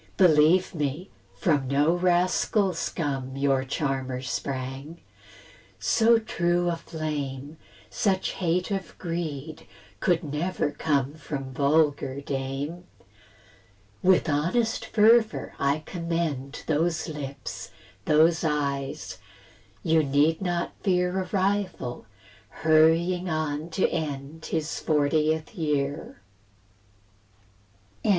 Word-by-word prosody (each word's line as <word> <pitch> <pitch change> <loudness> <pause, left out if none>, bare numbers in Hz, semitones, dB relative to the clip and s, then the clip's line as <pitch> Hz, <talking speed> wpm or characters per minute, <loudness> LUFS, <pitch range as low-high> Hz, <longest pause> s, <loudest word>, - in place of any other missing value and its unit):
Believe 170 0 +5
me, 150 +3 -3 0.2
from 140 - +1
no 145 +5 +3
rascal 180 +2 +2
scum 135 -5 -3
Your 135 -1 +2
charmer 130 -2 -2
sprang; 135 +3 -4 0.8
so 230 0 +4
true 175 -5 0
a - - -1
flame, 150 -3 -5 0.3
Such 190 -2 0
hate 180 +2 -1
of 195 -5 -4
greed, 160 -3 -5 0.3
could 175 -2 +2
never 150 +1 -1
come 140 -3 0
From 135 -4 -6
vulgar 140 -1 +2
dame. 140 +5 -4 1.2
With 185 -2 +4
honest 175 +11 0
fervour 220 +1 +3
I 140 +2 +1
commend 165 -6 -3
Those 165 +3 0
lips, 145 -3 -6 0.4
those 160 +2 +4
eyes; 140 -3 -2 0.6
you 160 0 +4
need 145 +4 +2
not 175 -2 -1
fear 180 -1 +1
A - - -4
rival, 190 - -1 0.4
hurrying 165 +3 +3
on 155 0 -2
to 175 +3 +1
end 155 -1 -4
His 160 -1 -2
fortieth 155 +3 +1
year. 150 - -2 1.8
VI. - - 0
155 Hz, 100 wpm, -26 LUFS, 140-175 Hz, 1.8 s, Believe